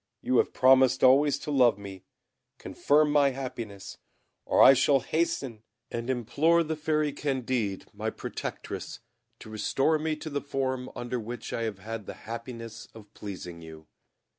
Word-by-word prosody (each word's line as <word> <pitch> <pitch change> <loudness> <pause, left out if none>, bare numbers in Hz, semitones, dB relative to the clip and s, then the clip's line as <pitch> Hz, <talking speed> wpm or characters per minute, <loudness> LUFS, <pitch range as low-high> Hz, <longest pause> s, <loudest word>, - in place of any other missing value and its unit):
You 130 - +2
have - - +2
promised 130 0 +4
always 140 +3 +5
to 150 - -6
love 125 -7 +4
me, 100 -2 -10 0.5
confirm 150 +1 +2
my 145 -1 +4
happiness, 120 -7 -7 0.5
or - - +1
I 135 - +10
shall 135 +1 +3
hasten 135 -6 -2 0.3
and 120 +1 -4
implore 140 +8 +2
the 160 0 -3
Fairy 155 -1 0
Candid, 130 -8 -2
my - - -3
protectress, - - -6 0.4
to 110 - -12
restore 135 +8 +1
me 155 0 -1
to 155 +1 -8
the 145 0 -2
form 130 -2 -3
under 120 +1 -3
which 120 +2 -7
I - - -2
have 100 - -11
had 110 +2 -7
the - - -6
happiness 115 0 -7
of 105 -1 -14
pleasing 90 -4 -8
you." 80 -1 -12
130 Hz, 155 wpm, -28 LUFS, 110-145 Hz, 0.5 s, I